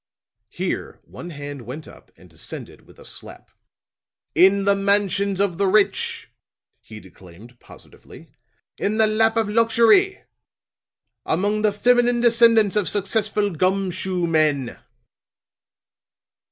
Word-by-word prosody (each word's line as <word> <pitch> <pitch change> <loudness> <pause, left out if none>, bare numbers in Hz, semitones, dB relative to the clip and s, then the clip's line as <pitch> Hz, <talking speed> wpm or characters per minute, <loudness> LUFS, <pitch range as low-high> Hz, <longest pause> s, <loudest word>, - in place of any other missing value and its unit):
Here - - -5
one 105 - -11
hand 145 -3 -8
went 130 +6 -9
up - - -17
and - - -18
descended - - -11
with - - -20
a - - -15
slap. - - -12 0.8
"In 195 +3 +3
the 200 - +4
mansions 200 -1 0
of 195 -3 -1
the 200 - +1
rich," 205 +1 0 0.5
he 110 -1 -13
declaimed 95 +5 -17
positively; - - -17 0.5
"in 215 +2 -1
the 220 - +5
lap 220 +1 +1
of 225 -2 0
luxury. 230 - +2 1.0
Among 205 +6 -1
the 210 -1 +2
feminine 245 +3 +2
descendants 230 -3 +4
of 210 -3 0
successful 205 0 -1
gum 185 +3 -1
shoe 185 0 -3
men!" 155 -6 -1
200 Hz, 120 wpm, -21 LUFS, 165-215 Hz, 1.0 s, the